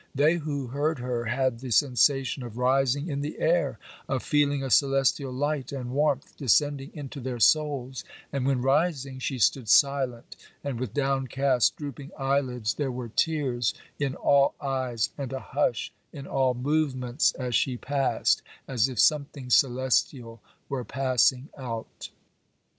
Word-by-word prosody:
They 150 +5 +3
who 145 -4 -3
heard 145 +5 -1
her 125 -1 -3
had 130 0 0
the 130 0 -7
sensation 135 +2 +2
of 120 -2 -8
rising 135 +3 +1
in 140 -3 -3
the 150 +2 -5
air, 170 +2 +1 0.3
of 135 -2 -1
feeling 145 -2 +1
a 135 - -4
celestial 135 0 +2
light 145 +1 -2
and 125 -3 -5
warmth 140 -1 0
descending 140 +1 +1
into 145 -2 -7
their 125 -1 -4
souls; 135 -1 +2 0.3
and 135 -2 -1
when, 130 -3 +1
rising, 135 -2 0
she 130 0 -3
stood 120 0 +1
silent 135 -4 +2 0.3
and 135 -5 -3
with 125 -5 -5
downcast 135 -2 +1
drooping 140 -1 -7
eyelids, 130 -4 0
there 140 -3 -2
were 125 -1 -6
tears 130 -3 0 0.2
in 140 -2 -1
all 140 0 +3
eyes, 130 -5 -1
and 135 -2 -4
a 135 - -3
hush 130 -5 -1 0.2
in 140 -3 -9
all 130 -2 +1
movements 130 -1 0
as 125 -2 -4
she 125 +1 +1
passed, 135 +1 +1 0.3
as 125 -1 +1
if 125 - -7
something 140 +2 +1
celestial 125 -2 +1 0.3
were 135 -2 -3
passing 130 +1 +1
out. 115 -4 -6
135 Hz, 145 wpm, -27 LUFS, 125-140 Hz, 0.3 s, They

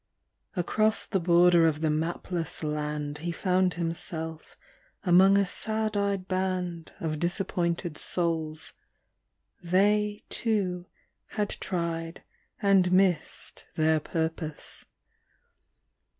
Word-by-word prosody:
Across 215 +4 +1
the 195 - 0
border 175 -1 +5
of 155 -1 0
the 155 -1 +2
mapless 165 +1 -3
land 150 -1 -2
He 170 +2 -3
found 180 0 +1
himself 160 -1 -5 0.5
among 190 +1 +6
a 200 - +4
sad 215 +3 -2
eyed 200 -2 0
band 185 -3 -2
Of 155 -2 -2
disappointed 175 -2 -1
souls; 160 -3 -2 0.9
they, 205 +4 +2
too, 185 -6 -1 0.5
had 210 -1 +1
tried 165 -2 -3 0.4
And 195 -3 +4
missed 185 -4 +1
their 160 0 +3
purpose. 160 0 -3
175 Hz, 95 wpm, -28 LUFS, 160-190 Hz, 0.9 s, among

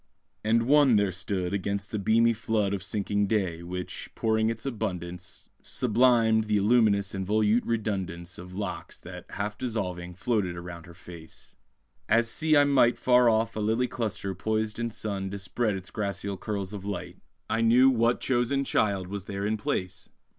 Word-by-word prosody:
And 115 +2 +3
one 140 -1 +5
there 100 -2 +2
stood 90 +1 -2
Against 100 0 -2
the 110 - -2
beamy 115 +3 +3
flood 110 -3 0
Of 100 - -2
sinking 100 -1 0
day, 95 -6 -1
which, 90 +1 -6
pouring 110 0 +1
its 115 +2 -5
abundance, 90 - -5
Sublimed 115 -2 +3
the 105 -1 +1
illuminous 100 -2 +3
and 95 0 -3
volute 110 +3 +2
redundance 95 -6 -3
Of 90 +1 -10
locks 100 -2 -5
that, 90 0 -10
half 105 +1 -4
dissolving, 90 -7 -4
floated 95 -3 -1
round 85 -1 -9
her 85 - -13
face; 85 -3 -13 0.5
As 115 0 +4
see 155 +6 +2
I 145 - +7
might 135 -4 +4
Far 125 -1 +4
off 115 0 +1
a - - -3
lily 110 +4 +1
cluster 105 -5 -3
poised 110 +3 -2
in 115 0 -1
sun 100 -3 -4
Dispread 100 +3 -2
its 95 0 -8
gracile 100 -2 -3
curls 100 0 -4
of 100 -2 -6
light. 90 -3 -5 0.3
I 115 - 0
knew 125 +4 +6
what 120 0 +2
chosen 130 +2 +1
child 100 -7 +1
was 100 +1 -6
there 100 0 -4
in 110 +1 +1
place! 95 -3 -3
105 Hz, 170 wpm, -27 LUFS, 95-115 Hz, 0.5 s, I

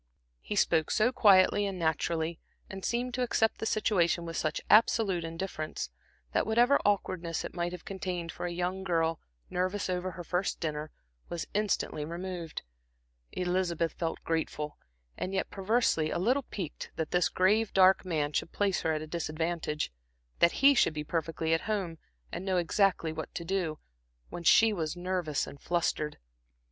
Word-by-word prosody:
He - - -4
spoke 160 -5 +3
so 225 +3 +3
quietly 205 -4 +5
and 195 -2 -4
naturally, 165 0 0 0.3
and 190 0 -7
seemed 245 +1 -1
to 250 - -1
accept 225 -2 +1
the 220 - -2
situation 175 -6 +2
with 165 0 -5
such 155 0 -1
absolute 210 -5 +4
indifference, 165 - -4 0.4
that - - +1
whatever 240 +5 +4
awkwardness 185 -5 0
it - - -7
might 175 0 -2
have 180 -1 -8
contained 180 -3 -4
for 175 - -4
a - - -4
young 180 +2 -2
girl 165 -3 +1 0.3
nervous 185 +2 -1
over 180 +1 -1
her 175 - -7
first 180 +3 -1
dinner, 155 -1 -3 0.4
was 170 - -3
instantly 205 -7 0
removed. 170 0 -5 0.7
Elizabeth 180 -2 0
felt 165 -1 -3
grateful, 155 -2 -2 0.4
and 190 +1 -2
yet 190 - -1
perversely 195 -6 +1
a - - -1
little 250 +9 +1
piqued 180 -7 -5
that 160 -1 -3
this 180 -1 +3
grave, 210 +4 +2
dark 190 0 +5
man 155 -5 -1
should - - -1
place 200 -2 +1
her 160 - +1
at 155 - -3
a - - -5
disadvantage, 155 - -2 0.5
that 170 +9 +3
he 280 +1 +9
should 200 - +3
be 150 - -2
perfectly 160 +1 -1
at 165 - +2
home 185 -7 -2 0.3
and - - -4
know 190 -1 0
exactly 175 -2 +2
what 160 -1 -6
to 170 - -4
do, 170 -4 -1 0.5
when - - -6
she 220 +6 +6
was 165 -2 -3
nervous 175 -4 -1
and 140 - -11
flustered. 165 -3 -1
175 Hz, 165 wpm, -30 LUFS, 165-195 Hz, 0.7 s, he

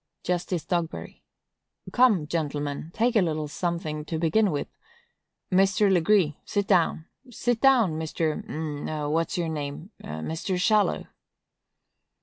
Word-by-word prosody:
Justice 180 -1 -2
Dogberry. 170 -2 -3 0.7
Come, 230 -11 +4
gentlemen, 145 -1 -3
take 235 +6 +1
a 215 - +6
little 155 -3 -1
something, 155 -1 -3
to 160 - -3
begin 195 +6 +2
with. 145 -4 -2 0.8
Mr. 195 +1 +4
Legree, 175 -3 +3
sit 205 -2 -1
down; 170 -4 +2 0.2
sit 240 -1 -1
down, 235 - +4
Mr.—a' 155 -1 -3
what's 165 +4 0
your 170 -2 -1
name?—Mr. 160 - -4
Shallow. 210 +2 +2
170 Hz, 110 wpm, -26 LUFS, 155-195 Hz, 0.8 s, a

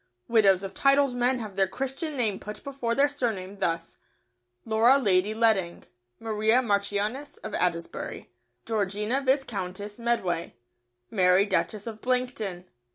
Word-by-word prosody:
Widows 200 -5 +4
of 195 - -6
titled 275 -1 +3
men 245 +1 +1
have 215 -5 -7
their 195 -1 +3
Christian 270 - -4
name 215 -6 0
put 210 0 -8
before 265 -4 -2
their 280 +1 +5
surname, 210 -9 -3
thus, 165 -1 -2 0.7
"Laura 225 +4 +5
Lady 205 -4 +2
Ledding," 215 -6 +2 0.4
"Maria 220 +1 +2
Marchioness 210 +6 -1
of 215 - -6
Adesbury," 170 -2 -2 0.3
"Georgina 210 +3 -1
Viscountess 205 -7 -2
Medway," 210 -8 -1 0.6
"Mary 185 -1 +4
Duchess 205 +1 -1
of 220 -2 -7
Blankton." 245 -8 -2
215 Hz, 125 wpm, -27 LUFS, 195-250 Hz, 0.7 s, their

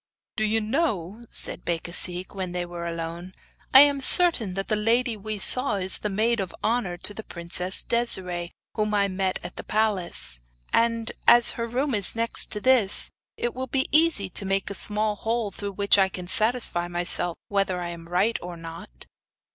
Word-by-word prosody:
'Do 215 - -2
you 215 +1 0
know,' 220 - -3
said - - -1
Becasigue, 175 +2 -1
when 185 -3 -6
they 180 0 -4
were 175 -1 -8
alone, 170 +2 -7 0.4
'I 265 - +9
am 285 -1 +2
certain 265 - +5
that 195 0 -5
the 215 - 0
lady 230 +3 0
we 215 +1 -7
saw 250 +3 +3
is 190 -1 +2
the 210 - -4
maid 220 +4 -1
of 190 -3 -6
honour 220 -6 -2
to 205 - -6
the 220 - -8
Princess 180 0 -1
Desiree, 180 -7 0 0.2
whom 210 -1 -2
I 200 -1 +1
met 190 -1 -3
at - - -8
the - - -7
palace. 185 - +1 0.3
And, 230 0 0 0.2
as 240 0 +6
her 230 0 -5
room 260 +4 -3
is 205 -2 +2
next 230 0 0
to 210 - -4
this, 240 -4 +5 0.3
it 240 - -4
will 260 +1 -6
be 265 +1 -1
easy 310 -11 +3
to 185 - -2
make 195 0 -2
a - - -4
small 210 +2 +3
hole 225 0 -3
through 200 +1 -7
which 200 +1 +2
I 190 -1 +2
can 180 -1 -8
satisfy 215 -4 +2
myself 175 0 0
whether 195 -2 -2
I 175 -1 -5
am 170 -1 -10
right 195 +6 -1
or 175 -1 -9
not. 165 - -12
200 Hz, 185 wpm, -23 LUFS, 180-230 Hz, 0.4 s, I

